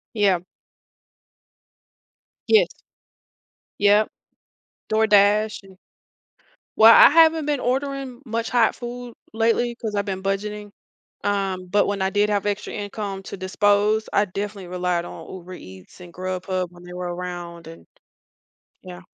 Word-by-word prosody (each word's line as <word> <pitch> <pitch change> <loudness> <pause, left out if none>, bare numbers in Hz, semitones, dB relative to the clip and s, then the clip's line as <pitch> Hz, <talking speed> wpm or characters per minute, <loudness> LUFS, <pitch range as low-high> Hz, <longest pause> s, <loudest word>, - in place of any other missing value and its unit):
Yeah. 200 -4 +3 2.1
Yes. 450 +3 +4 1.1
Yep, 205 +1 +4 0.8
DoorDash 210 -1 +3
an 190 -1 -16 1.0
well, 225 +1 +9
I - - +9
haven't 320 0 +5
been 290 -3 0
ordering 270 0 -3
much 230 -1 -3
hot 240 -3 +2
food 245 0 -8 0.2
lately 230 +2 +1
'cause 220 -3 -5
I've 200 0 -1
been 190 -1 -4
budgeting, 205 +1 -3 0.5
um, 195 -2 -2
but 205 +2 +2
when 200 -1 -2
I 190 - +1
did 205 +1 +1
have 205 -1 0
extra 205 0 -3
income 205 -1 -5
to 195 - -8
dispose, 205 +3 +1
I 205 - +3
definitely 200 -1 -6
relied 180 -1 -1
on - - -10
Uber 185 0 -10
Eats 95 - -13
and 175 -1 -12
Grubhub 185 0 -3
when 175 0 -16
they 180 0 -11
were 180 -1 -4
around 175 -1 -7
and 80 0 -12 1.0
yeah. 180 0 -10
205 Hz, 130 wpm, -22 LUFS, 185-220 Hz, 2.1 s, well